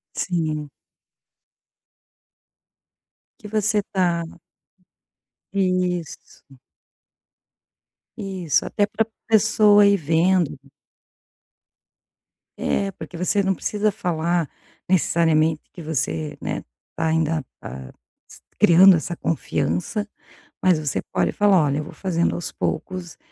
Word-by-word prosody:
Sim. 155 -5 -2 2.7
Que 210 - -10
você 215 0 +1
tá 175 -3 +1 1.3
Isso. 180 -7 -2 1.6
Isso, 185 -7 -1
até 205 - +1
para 225 - 0
a 225 - -52
pessoa 210 -1 +5
ir 200 - +5
vendo. 170 0 +1 2.0
É, 200 -1 0
porque 175 - -10
você 185 +4 +1
não 190 0 +1
precisa 210 +3 0
falar 170 -4 -1 0.4
necessariamente 160 -3 +2
que 175 - -10
você, 85 - -2
né, - - -4 0.3
tá 160 - -1
ainda, 160 -1 +1 0.2
tá - - -8 0.6
s - - -13 0.2
criando 185 +3 +7
essa 170 +2 -4
confiança, 155 - -2 0.6
mas 180 -4 +3
você 150 -3 -2
pode - - +1
falar: 200 -4 +4
"Olha, 140 -1 0
eu - - -3
vou - - -10
fazendo 175 -3 -1
aos 175 - -3
poucos 175 +1 -4
175 Hz, 100 wpm, -22 LUFS, 160-195 Hz, 2.7 s, criando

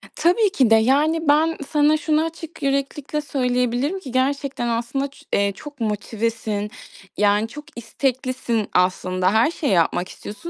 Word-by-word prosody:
Tabii 385 +5 +3
ki 260 -9 +3
de, 225 - +7
yani, 295 +8 +2
ben 315 +3 +3
sana 300 +1 +3
şunu 310 0 +1
açık 325 -1 -8
yüreklilikle 275 +2 -1
söyleyebilirim 250 +3 0
ki 265 - -9
gerçekten, 270 0 -1
aslında, 235 +4 -1
ç 280 - -19
eee, 200 0 +2
çok 295 +1 -11
motivesin, 215 -1 -2 0.5
yani, 205 +1 +3
çok 295 +6 -9
isteklisin, 250 -2 -2
aslında. 185 +1 +1
Her 225 +8 +4
şeyi 295 -7 -2
yapmak 175 +1 +2
istiyorsun. 270 +12 -8
260 Hz, 145 wpm, -22 LUFS, 225-295 Hz, 0.5 s, de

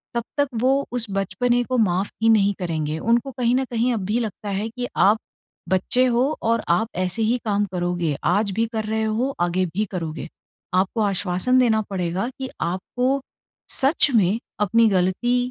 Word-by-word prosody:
तब 235 - 0
तक 285 -1 +3
वो 270 +2 +2
उस 245 -2 -1
बचपने 240 +5 0
को 255 +1 -2
माफ़ 195 -3 +1
ही 225 - +4
नहीं 205 -2 +4
करेंगे। 160 -3 -2
उनको 235 +6 +1
कहीं 245 -1 +1
न 265 - +1
कहीं 240 +1 +1
अब 205 -4 -2
भी 220 +4 0
लगता 215 -2 -4
है, 200 +3 -2
कि 245 +1 -5
आप 205 +3 +4 0.5
बच्चे 245 +7 +2
हो 250 +4 +2
और 230 0 +1
आप 180 +6 +2
ऐसे 185 +4 -1
ही 230 +3 +2
काम 205 -1 +1
करोगे, 175 -4 -1
आज 200 +3 +2
भी 225 +4 0
कर 220 -1 -1
रहे 220 +1 -1
हो, 235 +5 0
आगे 175 +2 +1
भी 210 +3 0
करोगे। 165 -3 -4 0.5
आपको 190 +5 +1
आश्वासन 200 +4 +1
देना 220 -3 +3
पड़ेगा 185 +1 -2
कि 265 -1 -4
आपको 245 +10 -1 0.6
सच 285 +2 +3
में 205 0 +3 0.2
अपनी 225 +3 +4
ग़लती 190 +6 +1
215 Hz, 180 wpm, -22 LUFS, 185-245 Hz, 0.6 s, ही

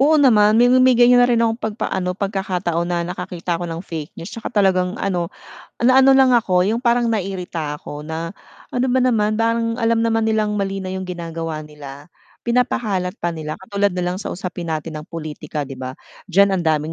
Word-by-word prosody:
oo 305 +3 +5
naman 215 -7 +5
may 245 +2 +5
may 255 -1 +5
ganiyan 245 0 +6
na 245 - +5
rin 235 -1 +3
ako 225 - +2
pagpa-ano 190 -4 -2
pagkakataon 190 -4 -2
na 175 -1 -1
nakakita 180 -1 -4
ako 175 - -4
ng 165 +2 -5
fake 160 -3 -7
news 165 - -8
tsaka 230 - -5
talagang 190 -3 +1
ano 175 -6 -1 0.5
naano 265 +2 +6
lang 265 -1 +6
ako 185 -6 +2
yung 220 - +1
parang 235 0 +3
nairita 180 -8 -3
ako 145 0 -8
na, 165 +4 -5 0.3
ano 250 0 -1
ba 260 - +3
naman 220 -3 +1
parang 230 +1 0
alam 230 0 +2
naman 225 -1 +1
nilang 215 -1 +1
mali 195 -1 -3
na 185 - -4
yung 190 -1 -5
ginagawa 165 -3 -5
nila, 145 0 -11 0.3
pinapakalat 220 -6 0
pa 175 -5 -2
nila 155 -1 -5
katulad 200 +1 +1
na 180 0 -1
lang 185 - -5
sa - - -5
usapin 175 -2 -5
natin 155 -1 -4
ng 150 - -14
pulitika, 155 -2 -5
'di 135 - -9
ba? 130 0 -6 0.3
Diyan 195 +2 +4
ang - - -5
daming 155 +1 0
190 Hz, 195 wpm, -20 LUFS, 165-230 Hz, 0.5 s, ganiyan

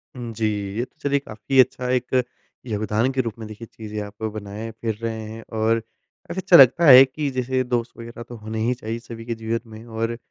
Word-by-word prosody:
हुँ 120 -2 -6
जी, 110 0 -1 0.3
ये 120 - 0
तो - - -34
चलिए 140 0 +1
काफ़ी 130 +1 -1
अच्छा 125 0 +3
एक 125 0 +1 0.4
योगदान 110 +2 0
के 130 - +2
रूप 115 -3 -4
में 110 - -6
देखिए 110 +2 -9
चीज़ें 105 -1 -6
आप 105 +1 -9
बनाए 105 +1 -6
फ़िर 110 0 -3
रहे 115 -1 -3
हैं 115 +1 -8 0.2
और 115 +1 +3
काफ़ी 115 +10 -10
अच्छा 185 -1 +5
लगता 135 +5 +7
है 130 -3 +11
कि 145 +2 -3
जैसे 130 0 0
दोस्त 120 -1 -1
वग़ैरह 115 0 -8
तो 120 - -7
होने 110 +1 -5
ही 125 - +2
चाहिए 115 -1 -5
सभी 115 -1 -10
के 115 -1 -3
जीवन 115 +1 -4
में 110 +1 -10
और 115 0 -3
115 Hz, 215 wpm, -23 LUFS, 110-125 Hz, 0.4 s, है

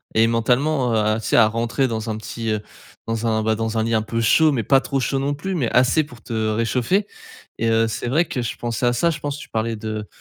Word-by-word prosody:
et 110 +1 +5
mentalement, 125 +4 +1
heu, 110 - +2
à 110 +1 +1
tu - - -6
sais - - +3
à 110 -2 +7
rentrer 115 +4 0
dans 110 -1 -4
un 110 - -2
petit, 115 +1 -5
heu, 105 -1 0 0.5
dans 115 0 -1
un, 110 -1 +1
bah, 110 0 +1
dans 115 +1 -2
un 110 - +2
lit 115 +1 -1
un 110 - +3
peu 115 +1 -3
chaud. 155 +8 +4
Mais 125 -5 -1
pas 135 +2 +4
trop 135 -1 -2
chaud 135 +1 -1
non 140 +1 -1
plus, 185 +7 -4
mais 130 -9 0
assez 125 +5 +4
pour 125 -5 -14
te - - -7 0.2
réchauffer 120 - 0 0.5
et 115 - 0
heu, 115 0 +3
c'est 110 - -4
vrai 150 +8 +2
que 130 - -3
je 120 - -3
pensais 120 +1 -2
à 120 - +3
ça. 170 +8 +2
Je 160 - -4
pense, 145 -2 -4
tu 145 - -10
parlais 115 +1 -2
de 110 -1 -5
115 Hz, 270 wpm, -21 LUFS, 110-135 Hz, 0.5 s, à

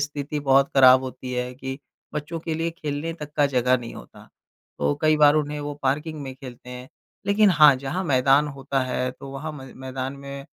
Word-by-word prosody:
स्थिति 145 0 -4
बहुत 135 -1 +4
खराब 130 -1 +7
होती 130 -1 -7
है 125 0 -3
कि 130 +1 -6 0.4
बच्चों 150 +3 -4
के 160 0 -3
लिए 165 +1 -1
खेलने 160 -1 -4
तक 150 0 -7
का 145 - +4
जगह 125 -1 +2
नहीं 120 -1 -9
होता। - - -13 0.5
तो 70 0 +1
कई 155 0 +4
बार 150 0 +6
उन्हें 150 -1 -1
वो 145 0 -5
पार्किंग 150 +3 -1
में 130 -1 -7
खेलते 125 -1 -11
हैं। 125 +1 -9 0.4
लेकिन 200 0 +4
हाँ, 150 -5 +7
जहाँ 140 +8 -4
मैदान 135 0 +3
होता 135 0 -2
है 125 0 -2
तो 135 +2 -11
वहाँ 150 +3 -6
म 135 -3 -10
मैदान 130 0 -5
में 140 0 -9
140 Hz, 200 wpm, -24 LUFS, 130-150 Hz, 0.5 s, खराब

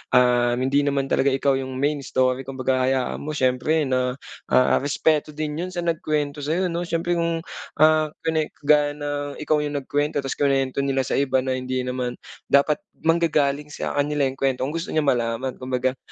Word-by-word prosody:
ah, 120 -1 +4
hindi 130 +3 +1
naman 140 -1 0
talaga 135 - +2
ikaw 135 0 +2
yung 130 0 -5
main 145 +3 0
story 130 -1 0
kumbaga 130 -1 0
hayaan 130 -1 0
mo 155 +1 -5
siyempre 130 +4 +1
na, 130 -2 0 0.3
ah, 130 - +4
respeto 150 +2 0
din 155 0 -3
yun 185 +1 -3
sa 175 - -2
nagkwento 155 -3 -1
sa'yo, 170 +5 -1
'no? 170 +1 -3
Siyempre 170 +1 0
kung, 165 -1 -1 0.4
ah, 155 0 +5 0.2
kwine 160 -1 0 0.2
gaya 145 0 +3
ng 145 -1 -4
ikaw 150 0 0
yung 150 0 -3
nagkwento 145 +2 -1
tas 135 - -4
kinwento 135 -1 +1
nila 135 -1 +1
sa 130 - -1
iba 130 -2 +2
na 130 0 -1
hindi 130 0 -2
naman 125 -1 -3 0.3
dapat 140 +2 +3 0.2
manggagaling 150 -3 +1
sa - - -4
kanila 145 +1 +1
yung 135 - -9
kwento 135 -2 0
kung 130 - 0
gusto 165 +3 -4
niya 155 - +2
malaman 125 -1 0
kumbaga 130 0 -1
140 Hz, 180 wpm, -23 LUFS, 130-150 Hz, 0.4 s, ah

